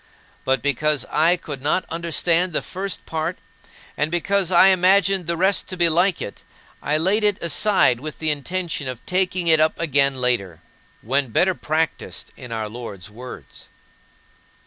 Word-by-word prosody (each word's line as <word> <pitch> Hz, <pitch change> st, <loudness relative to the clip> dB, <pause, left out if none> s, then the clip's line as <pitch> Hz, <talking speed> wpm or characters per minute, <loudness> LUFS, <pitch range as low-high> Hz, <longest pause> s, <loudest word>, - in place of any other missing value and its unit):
But 130 Hz, -3 st, +1 dB
because 145 Hz, +1 st, +1 dB
I 165 Hz, +4 st, +3 dB
could 145 Hz, -5 st, -7 dB
not 150 Hz, +6 st, 0 dB
understand 170 Hz, +1 st, 0 dB
the -, -, -1 dB
first 195 Hz, 0 st, -5 dB
part 160 Hz, +2 st, -3 dB, 0.6 s
and 150 Hz, -, -1 dB
because 185 Hz, +2 st, +1 dB
I 185 Hz, +1 st, +6 dB
imagined 190 Hz, 0 st, +3 dB
the 170 Hz, 0 st, -1 dB
rest 190 Hz, +3 st, +1 dB
to 185 Hz, -, -6 dB
be 170 Hz, -1 st, +4 dB
like 175 Hz, +3 st, +2 dB
it, 100 Hz, -, -9 dB, 0.4 s
I 150 Hz, -, 0 dB
laid 190 Hz, +7 st, +1 dB
it 205 Hz, -2 st, +2 dB
aside 170 Hz, -, +2 dB
with 155 Hz, +3 st, -7 dB
the 160 Hz, -1 st, 0 dB
intention 160 Hz, 0 st, -3 dB
of 125 Hz, -2 st, -7 dB
taking 185 Hz, -1 st, 0 dB
it 160 Hz, -2 st, +4 dB
up 155 Hz, 0 st, +2 dB
again 140 Hz, -4 st, +2 dB
later, 120 Hz, -10 st, -1 dB, 0.4 s
when 135 Hz, +4 st, 0 dB
better 180 Hz, -, +2 dB
practiced 160 Hz, -1 st, -3 dB
in 125 Hz, -3 st, -11 dB
our 110 Hz, -1 st, -3 dB
Lord's 105 Hz, -4 st, -8 dB
words. 125 Hz, +4 st, -11 dB
160 Hz, 160 wpm, -22 LUFS, 135-180 Hz, 0.6 s, I